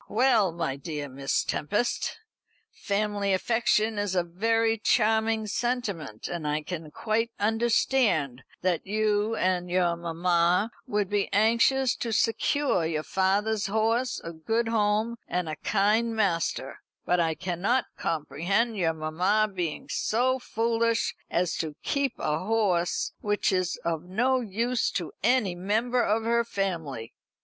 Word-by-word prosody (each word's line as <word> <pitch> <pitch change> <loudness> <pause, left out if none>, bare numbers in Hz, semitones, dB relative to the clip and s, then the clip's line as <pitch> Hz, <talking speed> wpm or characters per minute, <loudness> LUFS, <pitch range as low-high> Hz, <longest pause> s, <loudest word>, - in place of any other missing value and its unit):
"Well, 225 -5 +3
my 165 -5 -3
dear 150 -1 -5
Miss 135 +1 -1
Tempest, 210 +10 -1 0.5
family 205 -1 -1
affection 220 +1 +1
is 205 -2 -1
a 180 - +2
very 225 +6 +1
charming 220 0 +2
sentiment, 205 - -3
and 170 -3 -4
I 150 +1 -1
can 165 -1 -6
quite 225 +7 -1
understand 215 - +1 0.2
that 180 -1 0
you 215 +1 +1
and 180 -2 0
your 175 -1 +2
mamma 170 +4 +1 0.2
would 210 -4 0
be 205 +1 -1
anxious 230 +4 +3
to 230 - -3
secure 225 - +1
your 160 -1 -1
father's 200 +4 +1
horse 225 +4 0
a 170 - -6
good 225 +8 -1
home 220 +1 +1
and 180 -1 -2
a 155 - -3
kind 215 +5 +1
master; 170 -9 -1 0.3
but 180 - +2
I 165 -2 +1
cannot 190 +9 0
comprehend 185 +8 -1
your 165 -4 +1
mamma 180 +7 +1
being 175 -5 -3
so 255 +4 +1
foolish 230 -1 0 0.2
as 175 0 0
to 155 -2 -3
keep 280 -3 -1
a 150 0 -1
horse 190 -4 0
which 205 -1 0
is 185 -2 0
of 165 0 -1
no 245 +8 +1
use 235 +3 0
to 170 -5 -3
any 225 -4 +2
member 220 +7 0
of 220 0 +1
her 235 +1 +2
family. 165 - -3
205 Hz, 135 wpm, -27 LUFS, 170-225 Hz, 0.5 s, Well